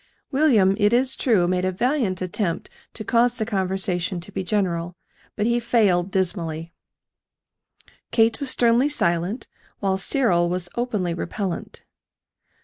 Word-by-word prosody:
William, 255 Hz, -10 st, +4 dB
it 210 Hz, +1 st, +3 dB
is 255 Hz, +2 st, +2 dB
true, 205 Hz, -9 st, +2 dB
made 180 Hz, 0 st, 0 dB
a 185 Hz, -, +1 dB
valiant 225 Hz, -3 st, 0 dB
attempt 180 Hz, -1 st, -2 dB, 0.2 s
to 215 Hz, -, -6 dB
cause 240 Hz, +2 st, +2 dB
the 220 Hz, -, 0 dB
conversation 190 Hz, -3 st, -1 dB
to 175 Hz, +4 st, -9 dB
be 190 Hz, -, -3 dB
general; 175 Hz, -3 st, -1 dB, 0.4 s
but 210 Hz, -, -1 dB
he 235 Hz, +1 st, +2 dB
failed 200 Hz, -7 st, +2 dB
dismally. 170 Hz, -4 st, -2 dB, 1.4 s
Kate 225 Hz, -1 st, +2 dB
was 280 Hz, -, -1 dB
sternly 240 Hz, +3 st, +3 dB
silent, 175 Hz, -, -1 dB, 0.3 s
while 190 Hz, -1 st, 0 dB
Cyril 190 Hz, -7 st, +2 dB
was 180 Hz, 0 st, -3 dB
openly 210 Hz, -8 st, -1 dB
repellent. 175 Hz, +2 st, -5 dB
195 Hz, 135 wpm, -23 LUFS, 180-235 Hz, 1.4 s, William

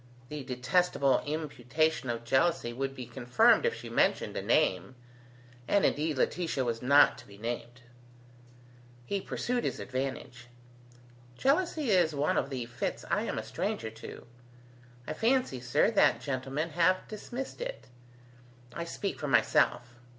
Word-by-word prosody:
The 150 Hz, -2 st, -5 dB
detestable 130 Hz, +2 st, +1 dB
imputation 155 Hz, -1 st, -1 dB
of 115 Hz, 0 st, -3 dB
jealousy 130 Hz, 0 st, +1 dB
would 135 Hz, +2 st, -3 dB
be 125 Hz, -, -6 dB
confirmed 120 Hz, +1 st, +3 dB
if -, -, -1 dB
she -, -, -9 dB
mentioned -, -, +1 dB
a -, -, -2 dB
name: 95 Hz, +8 st, +1 dB, 0.7 s
and 200 Hz, -, +3 dB
indeed 150 Hz, -1 st, 0 dB
Laetitia 160 Hz, -2 st, 0 dB
was 115 Hz, -1 st, -2 dB
not 140 Hz, +3 st, +5 dB
to -, -, -14 dB
be 100 Hz, -, -14 dB
named. 120 Hz, +2 st, -5 dB, 1.2 s
He 200 Hz, +8 st, -2 dB
pursued 245 Hz, +4 st, -2 dB
his -, -, -2 dB
advantage: 130 Hz, -2 st, -5 dB, 0.9 s
"Jealousy 295 Hz, -2 st, +1 dB
is 175 Hz, -5 st, +3 dB
one 145 Hz, +2 st, +1 dB
of -, -, -3 dB
the 130 Hz, -3 st, -4 dB
fits 120 Hz, +1 st, -4 dB
I -, -, +1 dB
am -, -, -3 dB
a 110 Hz, -, -2 dB
stranger 130 Hz, -, -3 dB
to, 110 Hz, +1 st, -10 dB, 0.8 s
I 155 Hz, -, -4 dB
fancy, 230 Hz, -, +1 dB
sir, 125 Hz, -, +2 dB
that 220 Hz, -, +4 dB
gentlemen 135 Hz, +4 st, -3 dB
have 175 Hz, +4 st, +2 dB
dismissed 245 Hz, -, -7 dB
it. -, -, -5 dB, 0.9 s
I 170 Hz, -, -4 dB
speak 195 Hz, +4 st, -4 dB
for 150 Hz, -, -3 dB
myself. 120 Hz, -3 st, +2 dB
140 Hz, 145 wpm, -30 LUFS, 120-175 Hz, 1.2 s, not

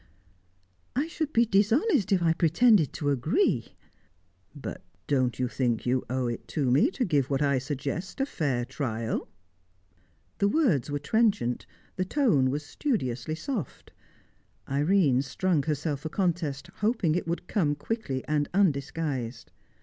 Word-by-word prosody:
"I 275 Hz, +4 st, +1 dB
should 315 Hz, -3 st, -3 dB
be 235 Hz, -3 st, +4 dB
dishonest 220 Hz, -, +2 dB
if 185 Hz, -3 st, +3 dB
I 165 Hz, -1 st, +4 dB
pretended 170 Hz, -, +4 dB
to 145 Hz, -2 st, -1 dB
agree." 155 Hz, -, +1 dB, 0.8 s
"But -, -, -7 dB, 0.2 s
don't 130 Hz, -4 st, +1 dB
you 125 Hz, -, 0 dB
think 120 Hz, -2 st, -1 dB
you 125 Hz, +1 st, +1 dB
owe 130 Hz, 0 st, 0 dB
it 120 Hz, -1 st, -4 dB
to 135 Hz, -5 st, +2 dB
me 145 Hz, -, +4 dB
to 270 Hz, -9 st, -1 dB
give 145 Hz, -7 st, +1 dB
what 140 Hz, +1 st, +1 dB
I 140 Hz, -2 st, +2 dB
suggest 145 Hz, -, -4 dB
a 270 Hz, -, +2 dB
fair 135 Hz, -, -1 dB
trial?" 115 Hz, -4 st, -3 dB, 1.1 s
The 200 Hz, -, +3 dB
words 205 Hz, -, +2 dB
were 145 Hz, -, -1 dB
trenchant, 200 Hz, -, +1 dB, 0.3 s
the 185 Hz, -, 0 dB
tone 185 Hz, -, +2 dB
was 145 Hz, +3 st, -3 dB
studiously 155 Hz, -, -2 dB
soft. 230 Hz, -, -5 dB, 0.8 s
Irene 145 Hz, -2 st, +3 dB
strung 155 Hz, +4 st, 0 dB
herself 150 Hz, -1 st, -2 dB
for 160 Hz, -, -5 dB
contest, 165 Hz, -7 st, -1 dB
hoping 210 Hz, -6 st, +1 dB
it 175 Hz, -, -1 dB
would 170 Hz, +1 st, -3 dB
come 155 Hz, -9 st, +1 dB
quickly 145 Hz, -, -3 dB
and 150 Hz, -1 st, 0 dB
undisguised. 140 Hz, -, -1 dB
155 Hz, 140 wpm, -28 LUFS, 135-200 Hz, 1.1 s, be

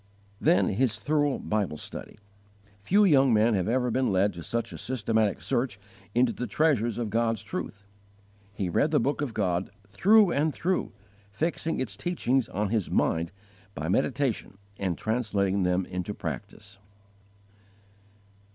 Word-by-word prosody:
9. 170 Hz, +3 st, +3 dB
His 115 Hz, +2 st, +1 dB
thorough 145 Hz, +3 st, +1 dB
Bible 100 Hz, -7 st, -2 dB
study. -, -, -9 dB, 0.6 s
Few 200 Hz, -, +3 dB
young 135 Hz, -7 st, +5 dB
men 110 Hz, +1 st, +4 dB
have 95 Hz, -3 st, 0 dB
ever 125 Hz, +1 st, +1 dB
been 130 Hz, 0 st, +1 dB
led 95 Hz, +1 st, +2 dB
to 85 Hz, -, -8 dB
such 115 Hz, +6 st, -3 dB
a -, -, -7 dB
systematic 110 Hz, -4 st, 0 dB
search 120 Hz, -6 st, -1 dB, 0.4 s
into 120 Hz, -1 st, +3 dB
the 125 Hz, -, -4 dB
treasures 125 Hz, -8 st, +1 dB
of 115 Hz, -3 st, -3 dB
God's 115 Hz, -2 st, 0 dB
truth. 100 Hz, 0 st, -6 dB, 0.7 s
He 95 Hz, -, -2 dB
read 115 Hz, -, +2 dB
the 150 Hz, -, +3 dB
Book 140 Hz, +4 st, 0 dB
of 130 Hz, -6 st, -3 dB
God 90 Hz, -3 st, 0 dB, 0.2 s
through 195 Hz, -, +5 dB
and 150 Hz, 0 st, +1 dB
through, 185 Hz, +2 st, -1 dB, 0.4 s
fixing 165 Hz, +5 st, -2 dB
its 110 Hz, -7 st, -3 dB
teachings 135 Hz, -, 0 dB
on 105 Hz, +1 st, -1 dB
his 110 Hz, -4 st, 0 dB
mind 85 Hz, +1 st, +1 dB, 0.4 s
by 75 Hz, +3 st, -3 dB
meditation 130 Hz, -2 st, 0 dB, 0.2 s
and 95 Hz, -4 st, -1 dB
translating 100 Hz, -4 st, 0 dB
them 90 Hz, 0 st, +1 dB
into 90 Hz, +3 st, -4 dB
practice. 100 Hz, -1 st, -7 dB
115 Hz, 145 wpm, -27 LUFS, 100-135 Hz, 0.7 s, young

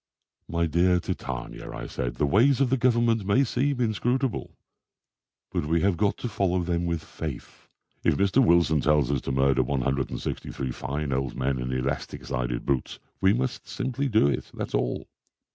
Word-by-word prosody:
"My 85 Hz, 0 st, 0 dB
dear 90 Hz, +3 st, +3 dB
Titania," 65 Hz, -7 st, -5 dB
I -, -, -6 dB
said, 60 Hz, -1 st, -3 dB
"the 75 Hz, -, +1 dB
ways 120 Hz, -, +4 dB
of 135 Hz, -3 st, +2 dB
the -, -, +5 dB
Government 120 Hz, -3 st, +2 dB
may 100 Hz, +8 st, +3 dB
seem 135 Hz, +2 st, 0 dB
inscrutable, 120 Hz, +2 st, -1 dB, 0.9 s
but 75 Hz, -, -1 dB
we 80 Hz, +1 st, +2 dB
have 100 Hz, -2 st, +3 dB
got 100 Hz, +2 st, +1 dB
to -, -, -4 dB
follow 95 Hz, -4 st, 0 dB
them 85 Hz, 0 st, -1 dB
with 85 Hz, -2 st, -2 dB
faith. 75 Hz, -6 st, -7 dB, 0.4 s
If -, -, +3 dB
Mr. 100 Hz, +7 st, +4 dB
Wilson 85 Hz, -, +4 dB
tells 75 Hz, -3 st, +3 dB
us 70 Hz, -, 0 dB
to -, -, -3 dB
murder 65 Hz, 0 st, +3 dB
163 65 Hz, 0 st, -2 dB
fine 70 Hz, +2 st, -3 dB
old 65 Hz, 0 st, -1 dB
men 65 Hz, 0 st, -1 dB
in 65 Hz, +1 st, -3 dB
elastic 65 Hz, +2 st, -3 dB
sided -, -, -2 dB
boots 70 Hz, -3 st, -1 dB, 0.2 s
we 95 Hz, -, +5 dB
must 125 Hz, +3 st, -2 dB
simply 130 Hz, +2 st, -2 dB
do 110 Hz, -, +4 dB
it, 70 Hz, -, -2 dB
that's -, -, -5 dB
all. -, -, -1 dB
85 Hz, 170 wpm, -26 LUFS, 70-115 Hz, 0.9 s, the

